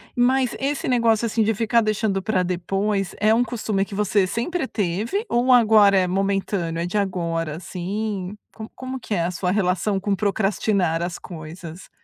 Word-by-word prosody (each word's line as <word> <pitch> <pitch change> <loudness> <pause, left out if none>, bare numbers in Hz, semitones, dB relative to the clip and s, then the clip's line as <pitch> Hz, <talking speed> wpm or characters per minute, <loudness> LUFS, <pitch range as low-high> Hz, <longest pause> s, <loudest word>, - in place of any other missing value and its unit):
Mas 255 +1 +2
esse 275 +1 -2
negócio, 230 -3 +2
assim, 225 0 0
de 220 0 +2
ficar 230 +2 +2
deixando 215 -2 0
pra 190 -3 0
depois 195 +3 -1
é 215 +1 +4
um 235 +2 +3
costume 220 -4 -1
que 200 0 -7
você 205 -2 +2
sempre 265 - -2
teve 210 - -2
ou 245 +2 +2
agora 215 -4 +6
é 185 - +3
momentâneo? 195 -3 -1
É - - -1
de 180 - -5
agora, 170 -5 -1
assim, 195 +3 -4 0.2
co 220 -1 -9
como 260 0 -6
que 215 - -3
é 170 - 0
a 175 - -1
sua 180 +1 -2
relação 190 0 +1
com 200 0 0
procrastinar 195 -4 0
as 175 -1 -3
coisas? 165 +1 -10
200 Hz, 175 wpm, -22 LUFS, 180-225 Hz, 0.2 s, agora